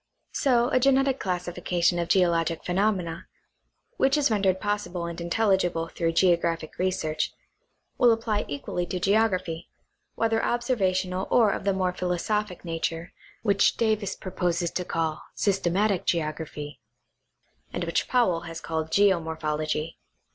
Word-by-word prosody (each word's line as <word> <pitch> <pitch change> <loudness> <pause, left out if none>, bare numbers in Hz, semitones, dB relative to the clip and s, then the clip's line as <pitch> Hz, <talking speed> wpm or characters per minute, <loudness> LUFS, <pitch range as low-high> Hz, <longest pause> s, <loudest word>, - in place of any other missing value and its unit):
So 245 -3 +2
a - - +3
genetic 270 0 +3
classification 175 -1 0
of 170 - -1
geologic 170 -3 +2
phenomena 180 -3 0 0.7
(which 270 +2 +3
is 285 -5 +2
rendered 195 -3 +2
possible 205 -4 -2
and 170 0 -5
intelligible 175 -3 +1
through 165 -1 -1
geographic 170 -2 +1
research) 160 -4 -1 0.7
will 245 -2 +6
apply 225 -2 0
equally 145 +5 -3
to 185 - -3
geography, 185 -4 +1 0.5
whether 225 0 +1
observational 190 -6 0
or 225 -4 +4
of - - -4
the 200 - +3
more 185 -1 0
philosophic 180 +2 -2
nature 165 0 -3 0.3
which 200 -2 +3
Davis 215 -4 0
proposes 175 -2 -2
to 180 - -2
call 160 -2 -2
Systematic 195 0 +1
Geography, 155 -3 -3 0.9
and - - -3
which - - 0
Powell 210 -10 +2
has 165 0 -6
called 160 -1 -3
Geomorphology. 160 -4 0
180 Hz, 125 wpm, -26 LUFS, 165-205 Hz, 0.9 s, will